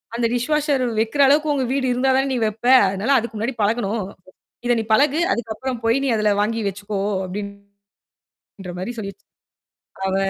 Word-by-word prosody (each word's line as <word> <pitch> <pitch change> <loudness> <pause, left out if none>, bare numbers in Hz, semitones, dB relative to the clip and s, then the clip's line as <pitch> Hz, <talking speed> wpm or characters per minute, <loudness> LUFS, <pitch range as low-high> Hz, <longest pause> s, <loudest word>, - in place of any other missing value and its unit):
அந்த 235 0 0
dish 245 +4 -2
washer 295 -3 +1 0.2
வெக்கிற 230 +6 +1
அளவுக்கு 300 +2 +3
உங்க 270 -2 0
வீடு 270 -1 0
இருந்தா 255 +2 +1
தான்டீ 270 -1 0
வெப்பே! 225 +4 +2
அதுனால, 200 +8 -1
அதுக்கு 235 -1 -3
முன்னாடி 230 +5 -2
பழகணும். 215 0 0 0.6
இத 240 - +3
நீ - - -1
பழகு. 290 +6 +3
அதுக்கப்புறம் 235 +2 -3
போய், 230 +3 +3
நீ - - 0
அதுல 215 -1 +2
வாங்கி 225 +2 -1
வெச்சுக்கோ!" 200 +1 -4 0.3
அப்படின்ற 200 +1 -8 1.0
மாரி 190 +6 -4
சொல்லி 200 -2 -5
வச் 195 - -39 0.8
அவ 190 - -1
230 Hz, 165 wpm, -21 LUFS, 205-265 Hz, 1.0 s, அளவுக்கு